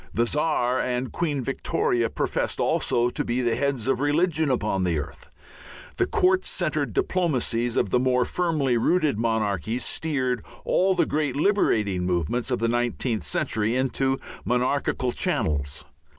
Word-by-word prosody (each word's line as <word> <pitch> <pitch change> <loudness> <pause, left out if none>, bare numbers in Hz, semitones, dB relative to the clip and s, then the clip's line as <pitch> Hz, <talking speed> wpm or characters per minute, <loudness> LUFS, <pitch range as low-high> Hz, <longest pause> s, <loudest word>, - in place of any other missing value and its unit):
The 120 - +3
Czar 130 -2 +1
and 125 0 -2
Queen 145 -6 -1
Victoria 120 -2 0
professed - - -2
also 120 +1 +1
to - - -2
be 120 +2 -1
the 120 -2 +1
heads 140 -4 -1
of 135 - +1
religion 155 +2 +1
upon 105 -7 0
earth. 80 -5 -4 0.7
The - - +2
court 185 0 +2
centered 155 - -1
diplomacies 120 - 0
of 100 - +1
the 125 - +3
more 125 -1 +2
firmly 155 -8 0
rooted 150 -2 +1
monarchies 110 -1 -1
steered 130 -7 -1 0.2
all 190 +1 +2
the 175 - +3
great 150 -3 -1
liberating 110 - +1
movements 90 - -1
of 125 - +1
the 115 - 0
nineteenth 120 -1 -1
century 110 +2 0
into 135 +1 0 0.3
monarchical 125 0 0
channels. 75 -6 -1
125 Hz, 140 wpm, -25 LUFS, 115-145 Hz, 0.7 s, The